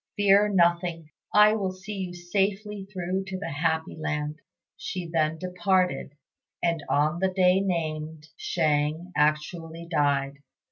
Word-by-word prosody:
Fear 205 0 +5
nothing; 170 -2 +1 0.2
I 210 +1 +6
will 200 -4 -1
see 190 +3 -8
you 185 -3 -4
safely 195 +3 -2
through 185 0 -2
to 190 -1 -5
the 190 - -5
happy 160 +2 -1
land." 150 -1 -3 0.4
She 180 -1 -5
then 160 -1 0
departed, 180 -4 0 0.5
and 170 -3 +1
on 155 +4 +2
the 190 +1 +2
day 185 0 +4
named 160 -4 -3
Shang 155 +2 0
actually 160 +2 0
died. 140 -2 +1
175 Hz, 130 wpm, -26 LUFS, 155-190 Hz, 0.5 s, I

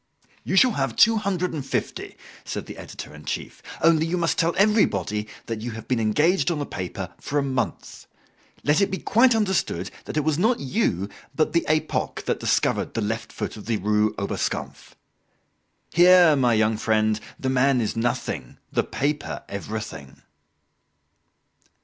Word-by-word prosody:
"You - - -2
shall 250 +6 +6
have 135 - -1
two 225 0 +6
hundred 185 -4 -1
and 150 -4 -3
fifty," - - -4 0.3
said - - -5
the - - -9
editor - - -9
in - - -12
chief; - - -5 0.2
"only 160 0 +4
you 180 +2 -1
must 170 -1 0
tell 165 +1 +2
everybody 105 - +2 0.2
that 115 -2 -4
you 120 0 -4
have 110 0 -9
been 125 -2 +1
engaged 150 - +2
on 170 - -1
the 145 - -2
paper 90 -3 -6
for 145 - -3
a 145 - +2
month. 130 -2 -3 0.6
Let 150 +6 +3
it 200 - +3
be 190 - -2
quite 235 +5 +4
understood 190 - 0
that - - -5
it 150 - +2
was 155 +1 +1
not 230 +6 +2
you 130 - 0 0.3
but 155 - +1
the 170 - +3
'Epoque' 155 0 -1
that - - -1
discovered - - 0
the 115 - 0
left 110 +2 -3
foot - - -5
of 105 - -11
the 115 -2 +1
Rue 105 +2 +1
Oberskampf. 100 - -4 1.0
Here, 175 -2 +7
my 125 -4 +3
young 110 0 +2
friend, 110 -1 +1 0.2
the 130 - -1
man 130 0 +3
is 110 -1 -1
nothing, 115 - -2
the - - +1
paper 145 +1 -3
everything." 100 -8 -7
135 Hz, 170 wpm, -24 LUFS, 110-170 Hz, 1.0 s, Here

